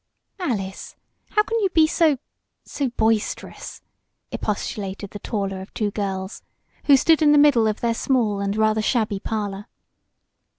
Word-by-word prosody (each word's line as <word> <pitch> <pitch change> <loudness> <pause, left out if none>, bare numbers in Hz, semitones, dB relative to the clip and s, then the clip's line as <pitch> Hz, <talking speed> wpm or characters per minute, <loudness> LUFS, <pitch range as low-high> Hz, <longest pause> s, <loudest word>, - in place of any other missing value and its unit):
"Alice! 200 - -4 0.3
How 425 - +3
can 455 +1 -1
you 395 -3 +1
be 320 -3 +4
so 310 -2 +2 0.5
so 275 -3 -2
boisterous?" 220 -2 -2 0.5
expostulated 200 -1 -4
the 205 - -7
taller 195 -4 -3
of 190 - -11
two 210 -2 -1
girls, 195 -1 -4 0.4
who 280 -2 +7
stood 320 +3 +3
in 295 -1 +5
the - - +5
middle 285 -7 +5
of 215 0 -2
their 235 -1 +1
small 230 -5 0
and 200 +1 -2
rather 215 0 +2
shabby 215 -3 0
parlor. 205 -1 -4
220 Hz, 145 wpm, -23 LUFS, 200-280 Hz, 0.5 s, who